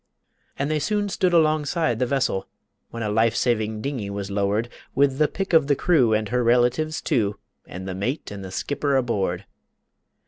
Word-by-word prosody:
And 140 +2 -1
they 155 - +1
soon 205 +4 0
stood 185 -1 +1
alongside 155 -4 +2
the 125 - +1
vessel, 135 -7 0 0.4
When 115 0 -5
a 105 - -1
life 110 +2 +2
saving 110 -3 0
dingey 130 -8 -3
was 100 0 -5
lowered 100 +3 0 0.3
With 135 0 +2
the 150 - +4
pick 195 +2 -4
of 160 -4 +5
the 145 - +3
crew, 135 -8 +3
and 110 -1 +1
her 125 0 +1
relatives, 125 +6 +2
too, 105 -3 0 0.3
And 95 +2 -7
the 95 - -3
mate 105 - -3
and 100 -1 -7
the 95 - -7
skipper 140 +7 -1
aboard. 100 -7 0
125 Hz, 180 wpm, -24 LUFS, 105-150 Hz, 0.4 s, of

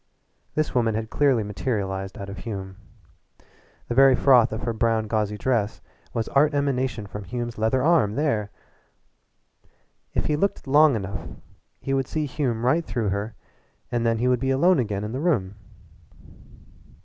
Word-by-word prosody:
This 155 0 0
woman 115 -4 +1
had 110 0 -4
clearly 135 -6 +2
materialized 95 -2 -3
out 100 - -6
of 100 -1 -8
Hume. 95 -3 -6 1.1
The - - -2
very 135 +1 +6
froth 125 -4 +5
of 110 +1 -4
her 115 0 -1
brown 115 -1 +1
gauzy 105 -1 -1
dress 110 -2 0 0.3
was 115 -2 -2
art 145 +2 +3
emanation 130 -5 -1
from 105 +1 -7
Hume's 120 +3 -5
leather 110 +4 +1
arm 150 -11 +3
there! 115 -9 0 1.7
If - - +1
he 150 - +1
looked 195 +6 -1
long 145 0 +5
enough 100 -2 -5 0.5
he 135 - -3
would 135 -1 0
see 155 -1 -2
Hume 130 -5 -2
right 160 +7 +3
through 115 -8 -2
her 100 +3 -3 0.6
and 120 -1 0
then 115 -1 +2
he 120 +3 0
would 125 -1 +2
be 135 +1 -1
alone 165 +6 +4
again 105 -4 -2
in 105 - -4
the 130 - -3
room. 105 - 0
115 Hz, 160 wpm, -24 LUFS, 105-135 Hz, 1.7 s, very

